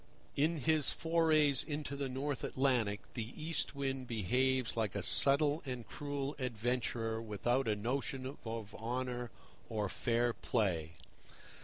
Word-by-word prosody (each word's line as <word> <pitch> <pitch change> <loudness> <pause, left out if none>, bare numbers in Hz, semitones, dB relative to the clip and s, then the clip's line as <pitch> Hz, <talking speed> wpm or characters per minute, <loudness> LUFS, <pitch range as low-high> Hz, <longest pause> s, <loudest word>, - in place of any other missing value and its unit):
In 160 +4 +2
his 155 0 +4
forays 155 -4 +3
into 145 -2 -4
the 140 -1 -2
North 135 +1 -2
Atlantic 120 -7 +1
the 115 0 -4
East 160 -1 -2
Wind 135 -2 -2
behaves 125 +3 +1
like 110 -4 -1
a 100 - -1
subtle 145 - +5
and 125 -6 -5
cruel 145 +5 -3
adventurer 115 -2 -1
without 115 +4 0
a 105 - +2
notion 130 +4 -2
of 115 -2 -5
honour 125 +1 -3 0.4
or 105 -3 -1
fair 120 +1 +1
play. 85 -11 0
125 Hz, 130 wpm, -35 LUFS, 115-140 Hz, 0.4 s, subtle